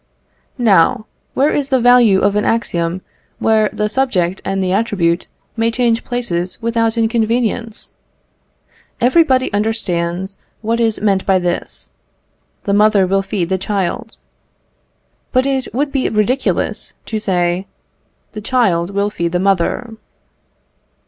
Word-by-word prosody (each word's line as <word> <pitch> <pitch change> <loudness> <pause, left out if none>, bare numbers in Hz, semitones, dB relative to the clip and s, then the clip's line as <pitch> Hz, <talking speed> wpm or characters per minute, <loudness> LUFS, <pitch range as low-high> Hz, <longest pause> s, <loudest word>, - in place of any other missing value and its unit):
Now, 215 0 +3 0.3
where 285 +3 +3
is 280 -2 -1
the 260 -2 +3
value 240 -5 +5
of 200 - +2
an 210 - +1
axiom 175 -6 -1 0.4
where 220 -1 +2
the 210 - -1
subject 195 -7 0
and 195 0 -1
the 185 - -1
attribute 190 -5 0 0.3
may 225 0 +1
change 230 -1 +1
places 185 -8 -3
without 230 0 0
inconvenience? 230 0 -1 1.0
Everybody 260 -1 +3
understands 190 -3 -1 0.3
what 230 +2 0
is 225 -3 +1
meant 195 -3 +1
by 190 -1 +4
this 175 -1 -4 0.7
"The 200 - -1
mother 210 -1 +4
will 195 +1 +1
feed 190 -3 -3
the 190 0 0
child." 195 +2 -3 1.1
But 255 0 +2
it 270 -2 -1
would 280 +3 -1
be 270 -2 0
ridiculous 220 +5 -1
to 220 - -3
say 180 -1 0 0.6
"The 215 - -7
child 200 -8 +1
will 200 +1 0
feed 170 -3 -2
the 180 - +1
mother." 195 +5 0
215 Hz, 130 wpm, -17 LUFS, 190-235 Hz, 1.1 s, value